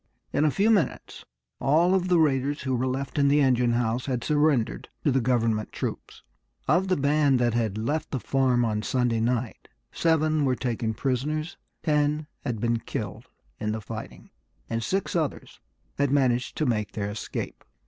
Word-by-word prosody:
In 150 - +2
a - - +5
few 200 +9 +2
minutes 190 - -1 0.3
all 165 +6 +3
of 185 -1 +2
the 180 -1 +4
raiders 145 -2 +1
who 130 -2 0
were 125 +2 0
left 135 +2 -2
in 140 - +4
the 145 +1 +4
engine 125 -3 +3
house 120 +2 0
had 125 -3 -1
surrendered 145 -6 +1
to 145 - +3
the 135 0 +2
government 115 -3 +1
troops. - - -5 0.4
Of 185 +2 +3
the 185 - +2
band 145 -1 +3
that 120 -2 +1
had 110 -3 0
left 145 +8 -2
the 135 - -2
farm 125 -2 +2
on 105 -2 -1
Sunday 120 0 0
night 120 0 -1 0.2
seven 155 -2 +2
were 130 -2 +2
taken 115 -2 -2
prisoners, 150 +6 -2 0.3
ten 150 0 +1 0.2
had 115 -3 -3
been 115 +1 +1
killed - - -6 0.3
in 105 0 -1
the 110 - -3
fighting, 110 +1 -8 0.4
and 115 0 -2
six 190 - -1
others 160 -4 -2 0.4
had 140 -1 +3
managed 130 -3 +1
to 155 - +1
make 105 -5 -1
their 105 -1 -3
escape. 105 - -5
130 Hz, 175 wpm, -26 LUFS, 115-150 Hz, 0.4 s, a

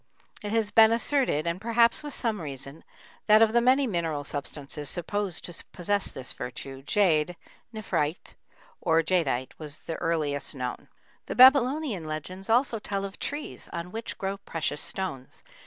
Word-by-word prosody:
It 205 - -4
has 220 -2 +1
been 220 0 +7
asserted, 235 - +1
and 170 +2 -2
perhaps 230 +1 +3
with 295 -1 -6
some 220 -6 -2
reason, 140 0 -7 0.4
that 215 +1 +7
of 220 0 +3
the 235 - +5
many 260 +3 +4
mineral 165 - -1
substances 145 0 -5
supposed 185 +2 -3
to 175 - -7
possess 200 +3 0
this 130 -1 -6
virtue, 135 +2 -7
jade 175 0 +2 0.4
(nephrite) 185 -7 -2 0.5
or 165 0 +3
jadeite 145 -8 0
was 150 -2 -8
the 165 - -6
earliest 155 -4 -1
known. 125 -2 -5 0.4
The - - -4
Babylonian 260 - +5
legends 180 +6 -6
also 235 0 +3
tell 200 -1 -2
of 195 - -8
trees 290 +1 -5
on 170 +1 -5
which 225 +2 -5
grow 195 0 -3
precious 160 -6 -3
stones. 135 -10 -3
185 Hz, 155 wpm, -27 LUFS, 150-225 Hz, 0.5 s, been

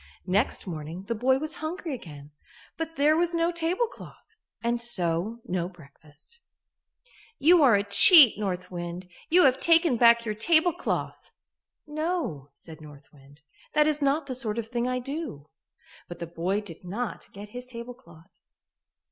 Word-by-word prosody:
Next 200 +7 0
morning 165 0 -7
the 230 - -3
boy 255 +4 +2
was 310 +2 -4
hungry 320 0 -4
again, 150 - -10 0.4
but 325 0 -5
there 295 +2 +3
was 340 +1 0
no 335 +1 +1
tablecloth 355 +7 -4 0.3
and 235 0 0
so 195 0 -1
no 180 -1 -2
breakfast. 155 - -16 1.0
"You 325 +4 +5
are 255 -7 +6
a 200 - +1
cheat, 290 - +7
North 185 -3 -4
Wind; 175 +1 -6 0.2
you 360 +2 +5
have 265 -1 +4
taken 330 -6 +3
back 235 0 +5
your 215 - -2
tablecloth." 315 +9 0 0.6
"No," 305 - -3
said 160 +2 -12
North 150 -1 -15
Wind, 140 +1 -20 0.3
"that 300 -1 +4
is 300 -1 0
not 280 +2 +1
the 265 - -5
sort 235 -4 -3
of 230 - -2
thing 240 0 -2
I 255 0 -1
do." 275 - -6 0.6
But 175 - -9
the 170 - -5
boy 175 +5 -2
did 180 -5 -12
not 210 +6 -5
get 205 +1 -10
his 245 +3 -9
tablecloth. 235 -9 -12
235 Hz, 155 wpm, -26 LUFS, -, 1.0 s, cheat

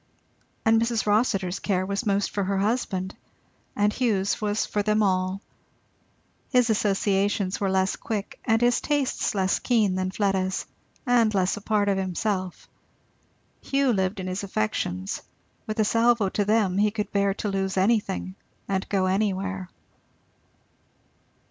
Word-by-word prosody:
And 225 0 +4
Mrs. 230 -1 0
Rossitur's 205 -4 +1
care 185 -2 0
was 200 +4 -2
most 200 0 +1
for 200 - -1
her 195 +1 0
husband; 195 -3 -1 0.6
and 205 +1 +2
Hugh's 205 -7 0
was 210 +1 0
for 210 - -1
them 215 +1 +2
all. 185 0 0 1.1
His 250 -3 +3
associations 200 -2 +1
were 195 - +1
less 190 0 +1
quick 210 -3 -5
and 225 +1 +2
his 240 0 +3
tastes 290 -7 0
less 190 -1 +1
keen 220 -6 +2
than 185 0 -1
Fleda's 190 -1 0 0.4
and 240 -4 +4
less 185 -1 +2
a 205 - -8
part 205 0 +1
of 195 -1 +1
himself. 185 0 -2 0.9
Hugh 275 -2 +1
lived 190 -1 -1
in 185 - -4
his 185 +1 -3
affections; 100 - -2 0.5
with 215 0 -4
a 215 - +4
salvo 230 -2 +3
to 205 +1 -1
them, 205 -3 +2
he 210 +1 +4
could 210 0 -4
bear 200 -1 +1
to 210 - -3
lose 195 -1 -2
anything 195 -2 +1 0.3
and 190 -1 -2
go 195 -2 +1
anywhere. 195 -1 -1
200 Hz, 145 wpm, -25 LUFS, 190-215 Hz, 1.1 s, And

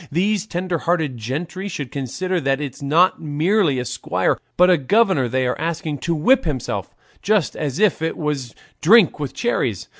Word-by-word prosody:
These 200 +5 0
tender 180 -2 -2
hearted 160 -6 0
gentry 165 - -4
should 145 -9 -5
consider 170 +7 -3
that 135 0 0
it's 140 -3 -6
not 165 +7 +3
merely 160 +1 +1
a 125 - -2
squire, - - -1 0.2
but 180 - +6
a 180 - +5
governor 175 - +2
they 130 +2 0
are 125 - -2
asking 160 -3 -3
to 170 +4 -1
whip 245 - +3
himself; 145 -7 -4 0.3
just 205 -5 +1
as 145 -3 -3
if 210 -4 +2
it 160 - -2
was 145 -6 -3 0.3
'drink 200 -1 +5
with 140 -3 -5
cherries. 120 - -1
160 Hz, 175 wpm, -21 LUFS, 140-185 Hz, 0.3 s, but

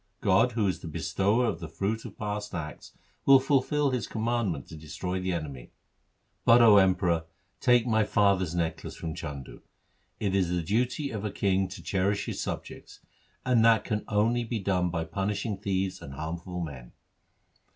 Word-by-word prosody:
God, 100 +5 +3
who 110 -2 +1
is 95 - 0
the - - -8
Bestower 100 +9 +1
of - - -1
the 80 - -7
fruit 100 +7 -2
of - - -9
past 105 -2 -4
acts, 75 -3 -7 0.3
will 135 -1 +7
fulfil 140 +1 +1
His 125 -5 -2
commandment 110 - -1
to - - -9
destroy 90 +4 -4
the 95 0 -2
enemy. 70 -8 -5 0.7
But, 115 +1 +7
O 110 -3 +8
Emperor, 90 -4 +3 0.3
take 125 -2 +4
my 110 -2 +3
father's 100 -5 +2
necklace 85 -2 -3
from 80 -2 -5
Chandu. 70 -5 -7 0.6
It 100 -3 -1
is 95 -3 +2
the 90 -1 -1
duty 125 - 0
of 105 -3 -4
a 105 - -1
king 95 -1 +1
to - - -10
cherish 100 +1 0
his - - -4
subjects, - - -7 0.4
and 125 -3 +4
that 115 -2 +5
can 105 -2 -2
only 115 +3 +2
be 115 0 -3
done 90 -3 0
by 85 -1 -2
punishing 100 +4 -2
thieves 95 -2 -2
and 70 - -9
harmful 85 +4 -5
men.' 65 -7 -7
100 Hz, 170 wpm, -28 LUFS, 85-110 Hz, 0.7 s, O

